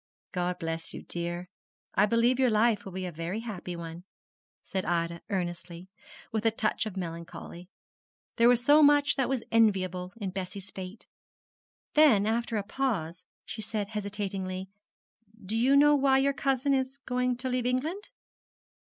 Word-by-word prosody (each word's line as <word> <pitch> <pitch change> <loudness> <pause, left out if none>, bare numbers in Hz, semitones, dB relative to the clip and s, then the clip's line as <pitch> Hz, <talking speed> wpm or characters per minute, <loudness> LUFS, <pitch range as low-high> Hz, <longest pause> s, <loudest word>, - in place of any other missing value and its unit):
_' - - -69
'God 180 -1 -1
bless 165 -1 -4
you, - - -7
dear. 175 +1 -4 0.5
I 205 - +4
believe 235 +3 +3
your 260 -2 +4
life 215 -1 +2
will 195 - -7
be 185 0 -4
a 180 - -4
very 170 +7 -4
happy 185 -6 -6
one,' 170 0 -7 0.6
said 190 -1 -3
Ida, 170 0 -1
earnestly, 175 -2 -3
and 180 - -13 0.5
with 220 -1 0
a 225 - +5
touch 220 0 -1
of 195 -3 -7
melancholy. 170 0 -7 0.7
There 235 0 +6
was 245 0 +3
so 295 +3 +7
much 290 0 +5
that 265 -3 0
was 265 -3 -1
enviable 185 -5 +2
in 200 -4 -3
Bessie's 195 +1 -6
fate. 190 +3 -8 0.9
Then, 275 -10 +6
after 230 +1 0
a 205 - -1
pause, 195 -9 -2 0.2
she 220 - -6
said 210 -1 -2
hesitatingly, 195 -3 -4 0.8
'Do 210 +4 0
you 255 +5 +4
know 295 +1 +7
why 270 -2 +4
your 275 +1 +3
cousin 275 0 +1
is 265 0 -1
going 250 -1 0
to 255 +1 -4
leave 250 -1 0
England?' 310 +11 -1
210 Hz, 165 wpm, -29 LUFS, 180-250 Hz, 0.9 s, so